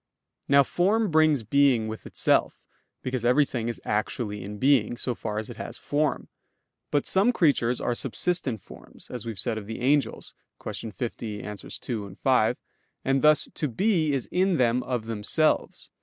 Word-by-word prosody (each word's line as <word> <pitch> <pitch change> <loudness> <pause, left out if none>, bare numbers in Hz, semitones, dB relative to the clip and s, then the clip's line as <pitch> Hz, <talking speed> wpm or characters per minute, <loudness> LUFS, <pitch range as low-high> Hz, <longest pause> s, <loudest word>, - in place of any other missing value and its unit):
Now 140 0 +6
form 200 - +1
brings 155 -5 +4
being 130 -1 +3
with 110 0 -7
itself, - - +1 0.4
because 130 -2 -2
everything 125 -2 +2
is 120 - -5
actually 105 0 -2
in 105 +2 -7
being, 125 -2 +3
so 125 - -2
far 105 -2 -5
as 110 - -3
it - - -9
has - - -7
form. 150 0 -1 0.6
But 145 - +1
some 200 +6 +4
creatures 140 - +2
are - - 0
subsistent 130 - -1
forms, - - -13
as 120 -2 -5
we - - -2
have - - -16
said 110 +1 -1
of 100 - -11
the 110 - -5
angels 140 +3 0 0.3
(Q. 110 - -6
50, 110 -1 -5
AA. 105 - -5
2, 100 0 -6
5): 125 -5 +3 0.5
and 135 0 +2
thus 150 -1 +4
to 150 - -2
be 160 - +1
is 135 -3 -2
in 185 -1 +2
them 125 -1 +2
of 125 -3 -3
themselves. 115 +8 0
125 Hz, 170 wpm, -26 LUFS, 110-150 Hz, 0.6 s, Now